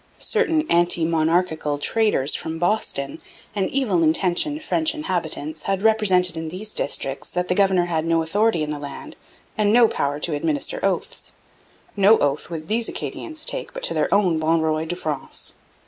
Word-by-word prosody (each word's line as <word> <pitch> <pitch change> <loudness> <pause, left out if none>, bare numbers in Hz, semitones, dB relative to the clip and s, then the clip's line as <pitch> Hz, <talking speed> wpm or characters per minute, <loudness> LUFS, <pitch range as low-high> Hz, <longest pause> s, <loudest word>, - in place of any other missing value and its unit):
Certain 335 -9 +1
'anti 170 -1 +2
monarchical 160 -2 +1
traders' 180 -5 +1
from 160 0 -3
Boston 170 -7 -1 0.3
and 195 -2 0
evil 230 -11 +1
intentioned 180 - +1
French 320 0 +1
inhabitants 160 - -3
had 195 0 0
represented 190 -6 +3
in 160 0 -4
these 200 +6 -7
districts 135 -1 -2
that 180 0 -2
the - - +3
governor 190 -2 +3
had 165 -2 -1
no 165 0 +1
authority 200 0 +1
in 150 - -3
the 150 - -4
land, 145 -1 -8 0.4
and 210 -2 +2
no 235 +1 +6
power 145 -6 -2
to 160 +1 -2
administer 145 -1 -1
oaths. 195 -3 -2 0.6
No 205 +2 +6
oath 145 +2 0
would 160 -2 -6
these 225 +3 0
Acadians 315 -1 -4
take - - -1
but - - -6
to - - +2
their - - 0
own 185 -6 +3
Bon 160 +1 +2
Roy 160 0 0
de 175 - -3
France. 155 -5 -5
175 Hz, 170 wpm, -22 LUFS, 155-210 Hz, 0.6 s, no